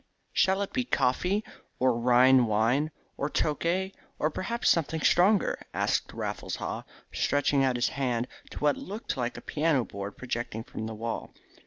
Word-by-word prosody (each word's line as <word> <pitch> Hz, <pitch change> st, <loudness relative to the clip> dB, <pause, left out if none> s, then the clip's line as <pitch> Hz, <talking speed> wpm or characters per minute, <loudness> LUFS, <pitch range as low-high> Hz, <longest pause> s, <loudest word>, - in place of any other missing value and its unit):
"Shall 190 Hz, +1 st, +3 dB
it 200 Hz, -, -7 dB
be 255 Hz, -, +1 dB
coffee, 190 Hz, -, +1 dB, 0.3 s
or 130 Hz, -1 st, +3 dB
Rhine 125 Hz, +1 st, +5 dB
wine, 115 Hz, +8 st, +2 dB, 0.3 s
or 140 Hz, -, -1 dB
Tokay, 170 Hz, +6 st, 0 dB, 0.2 s
or 155 Hz, -, +1 dB
perhaps 235 Hz, +9 st, -2 dB
something 160 Hz, -1 st, +2 dB
stronger," 190 Hz, +6 st, +3 dB
asked -, -, 0 dB
Raffles -, -, -4 dB
Haw, -, -, -4 dB, 0.3 s
stretching 145 Hz, 0 st, +2 dB
out 130 Hz, -2 st, +2 dB
his 120 Hz, -, +1 dB
hand 125 Hz, -3 st, -1 dB, 0.2 s
to -, -, -10 dB
what 145 Hz, -1 st, +2 dB
looked 210 Hz, 0 st, -5 dB
like 125 Hz, -3 st, -2 dB
a -, -, -7 dB
piano 150 Hz, -5 st, +1 dB
board 100 Hz, +1 st, -7 dB
projecting 120 Hz, -3 st, -4 dB
from 110 Hz, -1 st, -6 dB
the 110 Hz, -, -5 dB
wall. 115 Hz, +1 st, -5 dB
135 Hz, 160 wpm, -28 LUFS, 120-170 Hz, 0.3 s, Rhine